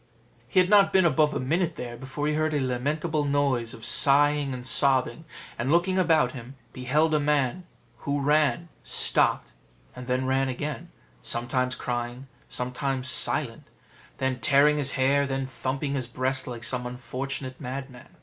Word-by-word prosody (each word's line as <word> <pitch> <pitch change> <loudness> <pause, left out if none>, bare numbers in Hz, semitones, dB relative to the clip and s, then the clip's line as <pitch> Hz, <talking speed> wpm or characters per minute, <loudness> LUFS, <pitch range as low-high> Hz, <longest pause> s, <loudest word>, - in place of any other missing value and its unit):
He 190 - +2
had 180 - +4
not 200 0 +5
been 190 -2 +4
above 155 -2 +2
a - - -1
minute 165 +5 -1
there 120 -1 -6
before 135 +4 -5
he 150 - +1
heard 155 0 0
a - - +1
lamentable 150 +5 -1
noise 140 -5 0
of 115 - -7
sighing 145 0 +4
and 125 -1 -6
sobbing; 130 +2 +1 0.3
and 130 +4 -1
looking 180 +3 +2
about 160 -7 +3
him, 130 +1 -10 0.2
beheld 150 +5 +1
a 150 - +3
man, 145 +3 0 0.3
who 140 +3 -2
ran, 150 +4 +1
stopped, - - +1 0.4
then 125 +1 -2
ran 135 0 +1
again, 140 +1 -5 0.3
sometimes 125 - 0
crying, 120 +1 -4 0.2
sometimes 130 +1 -2
silent, - - +1 0.5
then 130 -1 -2
tearing 145 +5 +4
his 140 -2 -1
hair, 140 +1 +2
then 135 0 -2
thumping 135 +2 -3
his 130 -3 -2
breast 130 +2 -1
like 120 -2 -7
some 125 +1 -2
unfortunate 130 +2 -6
madman. 130 -1 -7
135 Hz, 155 wpm, -26 LUFS, 125-150 Hz, 0.5 s, not